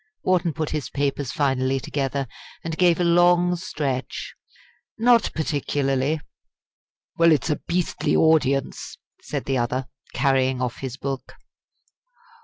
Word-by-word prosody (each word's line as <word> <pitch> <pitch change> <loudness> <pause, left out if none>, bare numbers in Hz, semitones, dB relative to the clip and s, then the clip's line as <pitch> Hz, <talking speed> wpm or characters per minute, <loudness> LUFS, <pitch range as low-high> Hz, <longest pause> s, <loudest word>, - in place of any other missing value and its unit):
Wharton 175 -3 +2
put 155 -1 -3
his 150 -3 -3
papers 140 -2 -1
finally 135 -1 +1
together, 135 0 -2 0.4
and 165 -1 -3
gave 175 0 +3
a - - +2
long 175 +1 +4
stretch. 140 -7 -4 0.6
"Not 235 0 +4
particularly." 145 -1 0 1.0
"Well, 165 0 +6
it's 155 +1 +2
a 150 - -1
beastly 170 -3 0
audience!" 140 -4 +2 0.2
said - - -4
the 135 -2 0
other, 125 +2 -1 0.3
carrying 130 -2 +2
off 125 -2 -2
his 130 -1 -6
book. 135 -1 -5
145 Hz, 120 wpm, -23 LUFS, 135-165 Hz, 1.0 s, Well